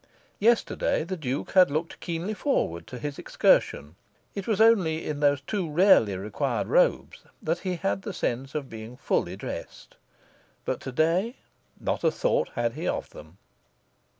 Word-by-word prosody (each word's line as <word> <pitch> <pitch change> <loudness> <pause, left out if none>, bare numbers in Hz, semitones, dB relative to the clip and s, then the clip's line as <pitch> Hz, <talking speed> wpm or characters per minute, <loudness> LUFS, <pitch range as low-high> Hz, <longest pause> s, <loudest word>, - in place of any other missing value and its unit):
Yesterday 230 -6 +2
the 185 +3 -4
Duke 140 -5 -3
had 185 -4 +6
looked 155 +3 -3
keenly 170 +5 -3
forward 205 - -1
to 125 - -7
his 145 +2 -5
excursion. 75 +3 +2 0.4
It 200 -2 -5
was 215 -3 +1
only 190 -8 +4
in 150 -1 -3
those 145 -1 +3
too 185 +1 -3
rarely 150 - +5
required 100 +2 -2
robes - - +2 0.2
that 165 +2 -1
he 185 0 -2
had 195 +3 -1
the 205 - -5
sense 135 -4 -3
of 145 -3 -2
being 115 +1 -9
fully 130 - -1
dressed. - - -8 0.7
But - - -1
to 135 - -6
day 170 - +1 0.4
not - - -2
a - - +5
thought - - 0
had 120 -1 0
he - - -4
of - - -2
them. 80 +4 -13
155 Hz, 160 wpm, -27 LUFS, 125-190 Hz, 0.7 s, had